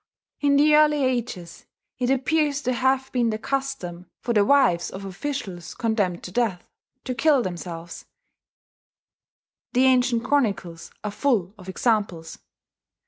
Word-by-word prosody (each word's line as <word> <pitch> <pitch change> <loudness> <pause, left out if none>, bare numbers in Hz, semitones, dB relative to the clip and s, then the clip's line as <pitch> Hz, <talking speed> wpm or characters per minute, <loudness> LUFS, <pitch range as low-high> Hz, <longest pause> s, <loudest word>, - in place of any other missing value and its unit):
In 285 -1 +3
the 300 +2 +5
early 300 -1 +4
ages 235 -9 -3 0.3
it 250 -1 0
appears 285 +2 +1
to 255 - 0
have 265 +1 +1
been 240 -2 +1
the 215 - -1
custom 220 -9 -4
for 240 - -2
the 210 -2 +4
wives 200 -9 +3
of 195 +1 -8
officials 195 - -5
condemned 205 -7 -1
to 180 - -7
death 200 -5 -1 0.4
to 255 - -3
kill 280 +1 +3
themselves 170 -2 -7 1.7
the 255 +1 +4
ancient 250 -2 +3
chronicles 200 -11 -1
are 210 - -3
full 210 -5 0
of 190 -3 -12
examples. 190 -6 -1
235 Hz, 135 wpm, -24 LUFS, 185-270 Hz, 1.7 s, the